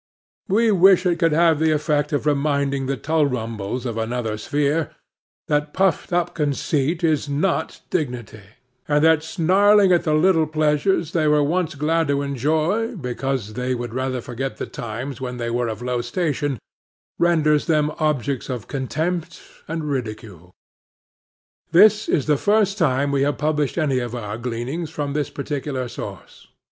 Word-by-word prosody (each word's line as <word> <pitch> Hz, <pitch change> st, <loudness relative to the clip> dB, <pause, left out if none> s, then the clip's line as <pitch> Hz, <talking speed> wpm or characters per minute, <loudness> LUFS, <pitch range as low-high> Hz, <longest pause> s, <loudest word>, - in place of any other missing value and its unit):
We 220 Hz, +3 st, +3 dB
wish 190 Hz, -1 st, +5 dB
it 175 Hz, -2 st, +1 dB
could 165 Hz, -2 st, +3 dB
have 165 Hz, 0 st, +3 dB
the 160 Hz, 0 st, +3 dB
effect 150 Hz, -1 st, 0 dB
of 145 Hz, -1 st, -1 dB
reminding 140 Hz, -2 st, 0 dB
the 135 Hz, 0 st, -1 dB
Tulrumbles 125 Hz, -7 st, -1 dB
of 115 Hz, -2 st, -3 dB
another 115 Hz, -1 st, -2 dB
sphere, 145 Hz, +7 st, 0 dB, 0.6 s
that 150 Hz, 0 st, -1 dB
puffed 190 Hz, -3 st, +1 dB
up 175 Hz, 0 st, 0 dB
conceit 150 Hz, +2 st, -1 dB
is 155 Hz, -3 st, +1 dB
not 160 Hz, +3 st, -1 dB
dignity, 125 Hz, -, -3 dB, 0.5 s
and 150 Hz, 0 st, +2 dB
that 160 Hz, -1 st, +5 dB
snarling 190 Hz, +5 st, +4 dB
at 175 Hz, -1 st, +3 dB
the 155 Hz, -3 st, +1 dB
little 160 Hz, -1 st, +3 dB
pleasures 155 Hz, +2 st, +1 dB
they 160 Hz, -3 st, +1 dB
were 150 Hz, -1 st, +4 dB
once 170 Hz, +2 st, 0 dB
glad 160 Hz, +3 st, +1 dB
to 140 Hz, 0 st, 0 dB
enjoy, 160 Hz, -, 0 dB
because 125 Hz, -, -3 dB
they 125 Hz, +2 st, -2 dB
would 120 Hz, -2 st, -5 dB
rather 130 Hz, 0 st, -2 dB
forget 130 Hz, +3 st, -5 dB
the -, -, -4 dB
times 120 Hz, +4 st, -6 dB
when 125 Hz, -1 st, -4 dB
they 120 Hz, -1 st, -3 dB
were 120 Hz, 0 st, 0 dB
of 110 Hz, +1 st, -5 dB
lower 125 Hz, -1 st, -1 dB
station, 145 Hz, +1 st, -2 dB, 0.6 s
renders 155 Hz, -3 st, +3 dB
them 150 Hz, -2 st, +2 dB
objects 140 Hz, -4 st, -1 dB
of 125 Hz, -5 st, -5 dB
contempt 155 Hz, +4 st, -3 dB, 0.3 s
and 160 Hz, 0 st, -3 dB
ridicule. 110 Hz, -, -5 dB, 1.2 s
This 215 Hz, 0 st, +6 dB
is 145 Hz, -, +1 dB
the 150 Hz, -2 st, +2 dB
first 205 Hz, -1 st, +2 dB
time 140 Hz, -3 st, +2 dB
we 140 Hz, -1 st, +1 dB
have 145 Hz, +1 st, +1 dB
published 150 Hz, -1 st, -1 dB
any 140 Hz, -6 st, +1 dB
of 120 Hz, -1 st, -4 dB
our 105 Hz, -2 st, -5 dB
gleanings 125 Hz, +7 st, -4 dB
from 145 Hz, -3 st, -4 dB
this 150 Hz, -1 st, -1 dB
particular 140 Hz, -3 st, -4 dB
source. -, -, -9 dB
145 Hz, 155 wpm, -22 LUFS, 130-160 Hz, 1.2 s, This